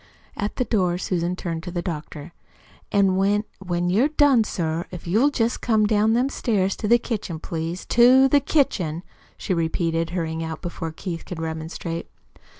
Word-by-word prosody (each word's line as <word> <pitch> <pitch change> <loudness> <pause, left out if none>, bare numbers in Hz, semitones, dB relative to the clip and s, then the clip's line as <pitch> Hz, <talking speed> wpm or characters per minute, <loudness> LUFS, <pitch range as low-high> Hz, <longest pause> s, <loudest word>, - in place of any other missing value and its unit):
At 205 -1 -3
the 250 - 0
door 180 -7 +1
Susan 180 -1 -1
turned 165 -3 -4
to 175 - -7
the 175 -1 -3
doctor. 155 -1 -6 0.6
"An' 195 -2 +3
when 200 +2 +2 0.2
when 175 -2 -1
you're 225 +9 +4
done, 290 -6 +4
sir, 165 -4 -2
if 180 -2 -9
you'll 220 +11 +3
jest 235 -4 -1
come 220 -3 +2
down 215 +1 +3
them 245 +3 +2
stairs 200 -8 0
to 210 - -3
the 235 +3 +6
kitchen, 215 -8 -4
please 165 +2 -4
TO 255 +3 +6
THE 285 +2 +4
KITCHEN," 185 - 0 0.3
she - - -2
repeated, 165 0 0
hurrying 165 -2 -3
out 160 -1 -5
before 165 -2 -4
Keith 165 +1 -6
could 180 - -7
remonstrate. 160 +1 -5
180 Hz, 170 wpm, -23 LUFS, 165-220 Hz, 0.6 s, the